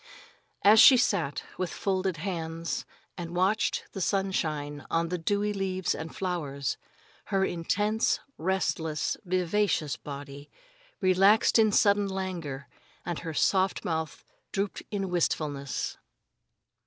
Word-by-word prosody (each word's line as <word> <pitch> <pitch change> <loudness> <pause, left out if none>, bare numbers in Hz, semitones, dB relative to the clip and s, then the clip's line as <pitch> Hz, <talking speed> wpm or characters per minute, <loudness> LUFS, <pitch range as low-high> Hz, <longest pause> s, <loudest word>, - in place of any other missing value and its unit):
As 215 +2 +7
she 260 - +10
sat, 175 - 0 0.2
with 185 -2 -1
folded 190 -2 -1
hands, 165 -1 -4 0.3
and 170 0 -5
watched 190 +5 +1
the 195 - -5
sunshine 155 -7 -1
on 165 0 0
the 180 - -1
dewy 205 +4 0
leaves 190 -2 -1
and 160 0 -6
flowers, 150 -7 -2 0.5
her 195 -1 +1
intense, 205 +6 0 0.2
restless, 160 -4 -1
vivacious 185 -3 0
body 140 0 -9 0.5
relaxed 195 +5 +5
in 215 -1 +5
sudden 200 -1 +4
languor 175 -8 -4 0.4
and 175 -1 -3
her 165 -2 -6
soft 190 +2 +2
mouth 160 -2 -3 0.3
drooped 200 0 -2
in 195 -3 -3
wistfulness. 145 -5 -1
180 Hz, 115 wpm, -28 LUFS, 160-195 Hz, 0.5 s, she